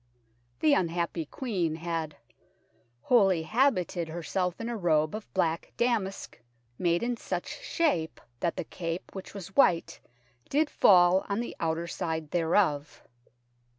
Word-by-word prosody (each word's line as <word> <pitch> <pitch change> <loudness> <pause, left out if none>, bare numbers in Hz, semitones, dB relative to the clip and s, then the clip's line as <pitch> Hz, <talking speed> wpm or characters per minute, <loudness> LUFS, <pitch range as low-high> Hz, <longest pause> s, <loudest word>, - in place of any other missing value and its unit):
The 305 -2 +5
unhappy 170 - 0
Queen 180 - -2
had 165 -2 -4 0.4
" 120 +2 -40
wholly 195 -9 +4
habited 185 - +1
herself 175 +2 -2
in 230 - -4
a 240 - -3
robe 155 -6 +2
of 215 0 -7
black 165 -3 0
damask, 220 - -1 0.4
made 175 +1 +1
in 245 0 0
such - - -4
shape 295 - 0 0.2
that 170 - -1
the - - -2
cape, 165 +1 -5
which 190 +1 -8
was 195 -1 -8
white, 175 -11 +3 0.5
did 295 +2 +1
fall 180 0 +5
on 200 +2 0
the 240 - -4
outer 165 0 -1
side 160 -2 -4
thereof." 160 -4 +1
175 Hz, 135 wpm, -28 LUFS, 165-205 Hz, 0.5 s, The